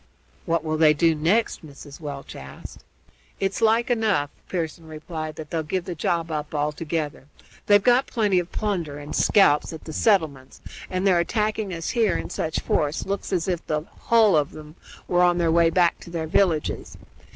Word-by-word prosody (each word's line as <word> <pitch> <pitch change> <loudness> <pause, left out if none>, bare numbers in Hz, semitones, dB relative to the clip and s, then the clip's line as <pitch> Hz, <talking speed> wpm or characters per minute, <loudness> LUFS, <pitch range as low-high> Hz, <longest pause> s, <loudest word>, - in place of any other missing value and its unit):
"What 165 -1 +1
will 155 -1 -1
they 155 -1 +5
do 165 +2 +3
next?" 170 +10 0
Mrs. 145 -1 -12
Welch 145 -3 -7
asked. 65 - -11 0.6
"It's 195 0 -1
like 230 +3 +3
enough," 215 -11 +1 0.2
Pearson 165 -2 -4
replied, 155 0 -6
"that 155 -1 -9
they'll 165 - 0
give 170 +3 -3
the 180 - -4
job 165 +1 -1
up 150 0 -4
altogether. 150 0 -2 0.4
They've 205 -1 +5
got 250 +3 +4
plenty 205 -5 +1
of 175 0 -5
plunder 175 -9 -2
and 145 0 -7
scalps 165 -7 +3
at 160 - -9
the 160 - -8
settlements, 155 - +1 0.3
and 185 +1 -2
their 185 -3 +4
attacking 215 +2 -1
us 165 -2 -3
here 220 -7 +2
in - - -6
such 160 - -2
force 150 +1 -1
looks 200 +1 -4
as 180 -2 0
if 175 -3 -1
the 150 -1 0
hull 220 +3 +2
of 150 -1 0
'em 155 0 -11 0.3
were 175 0 +2
on 175 -1 +4
their 170 -2 +2
way 170 0 +4
back 175 -1 +2
to - - -12
their 165 -2 -3
villages. 160 -2 0
165 Hz, 185 wpm, -24 LUFS, 155-195 Hz, 0.6 s, they